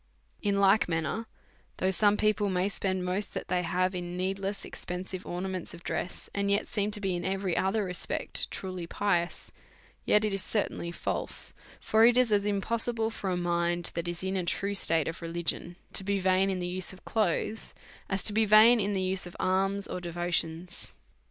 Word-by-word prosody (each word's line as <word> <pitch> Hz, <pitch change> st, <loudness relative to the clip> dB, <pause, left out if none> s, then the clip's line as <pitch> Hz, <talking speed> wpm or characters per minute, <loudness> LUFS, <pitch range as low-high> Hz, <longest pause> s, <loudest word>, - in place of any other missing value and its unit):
In 200 Hz, -1 st, +1 dB
like 200 Hz, 0 st, +4 dB
manner, 165 Hz, +7 st, -1 dB, 0.5 s
though 185 Hz, -, +1 dB
some 205 Hz, +2 st, +3 dB
people 210 Hz, -1 st, +2 dB
may 185 Hz, +1 st, +1 dB
spend 185 Hz, -2 st, -1 dB
most 185 Hz, +3 st, -2 dB
that -, -, -4 dB
they 180 Hz, -1 st, +2 dB
have 180 Hz, +2 st, 0 dB
in 175 Hz, -1 st, -4 dB
needless 195 Hz, +2 st, -2 dB
expensive 180 Hz, +1 st, -6 dB
ornaments 185 Hz, 0 st, -4 dB
of 170 Hz, -, -14 dB
dress, 180 Hz, -, -3 dB
and 200 Hz, 0 st, 0 dB
yet 200 Hz, +1 st, +2 dB
seem 205 Hz, -2 st, 0 dB
to 210 Hz, 0 st, -4 dB
be, 190 Hz, -3 st, -1 dB
in 175 Hz, -, -3 dB
every 190 Hz, -2 st, -1 dB
other 195 Hz, +5 st, +1 dB
respect, 180 Hz, -2 st, -2 dB
truly 185 Hz, -3 st, -5 dB
pious, 175 Hz, -3 st, -1 dB, 0.5 s
yet 210 Hz, +1 st, +4 dB
it 210 Hz, -, 0 dB
is 195 Hz, -, 0 dB
certahily 185 Hz, -4 st, -1 dB
false; -, -, -2 dB, 0.3 s
for 220 Hz, +1 st, +3 dB
it 240 Hz, +1 st, +6 dB
is 250 Hz, -3 st, +4 dB
as 205 Hz, -1 st, +3 dB
impos 215 Hz, +4 st, +1 dB
sible 225 Hz, -1 st, -1 dB
for 200 Hz, -3 st, -4 dB
a 180 Hz, -, 0 dB
mind 175 Hz, 0 st, 0 dB
that 170 Hz, 0 st, -3 dB
is 175 Hz, +1 st, -2 dB
in 190 Hz, +1 st, -1 dB
a 185 Hz, -, 0 dB
true 200 Hz, +3 st, -1 dB
state 165 Hz, -5 st, +2 dB
of 165 Hz, -, -4 dB
religion 170 Hz, +1 st, -3 dB, 0.2 s
to -, -, +2 dB
be 200 Hz, +1 st, 0 dB
vain 190 Hz, +1 st, +3 dB
in 190 Hz, -, -1 dB
the 180 Hz, -, -3 dB
use 185 Hz, +1 st, -1 dB
of 185 Hz, -, -16 dB
clothes, 215 Hz, +1 st, -1 dB, 0.3 s
as 195 Hz, -1 st, -1 dB
to 210 Hz, -, +3 dB
be 220 Hz, +1 st, +4 dB
vain 215 Hz, +3 st, +7 dB
in 205 Hz, 0 st, 0 dB
the 190 Hz, -1 st, 0 dB
use 185 Hz, 0 st, +1 dB
of 175 Hz, -, -11 dB
alms 195 Hz, +2 st, +1 dB
or 180 Hz, -, -4 dB
devotions. 175 Hz, 0 st, -2 dB
190 Hz, 195 wpm, -29 LUFS, 175-205 Hz, 0.5 s, vain